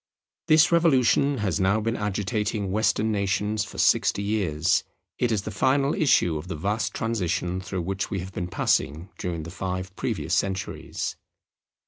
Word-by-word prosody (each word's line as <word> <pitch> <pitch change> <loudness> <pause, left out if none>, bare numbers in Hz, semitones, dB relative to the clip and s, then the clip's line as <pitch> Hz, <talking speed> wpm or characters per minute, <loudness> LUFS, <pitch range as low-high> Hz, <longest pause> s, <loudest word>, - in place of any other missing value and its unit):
This 155 0 +5
revolution 140 -4 +3
has 95 +1 0
now 95 +3 +3
been 115 +2 -1
agitating 105 0 -2
Western 110 +1 +1
nations 105 +1 0
for - - -10
sixty 100 - +3
years. 90 -7 +1 0.4
It 120 -2 +1
is 105 -3 0
the 110 - -5
final 135 +7 +2
issue 135 - +3
of 80 - -9
the 90 - -4
vast 100 +8 -2
transition 90 -5 -1
through 90 -1 -4
which 95 +2 -3
we 100 - -2
have 95 +1 -6
been 90 -4 -3
passing 80 0 0
during 85 -3 -3
the 85 - -8
five 95 0 -4
previous - - -2
centuries. 95 0 -2
100 Hz, 155 wpm, -25 LUFS, 90-110 Hz, 0.4 s, This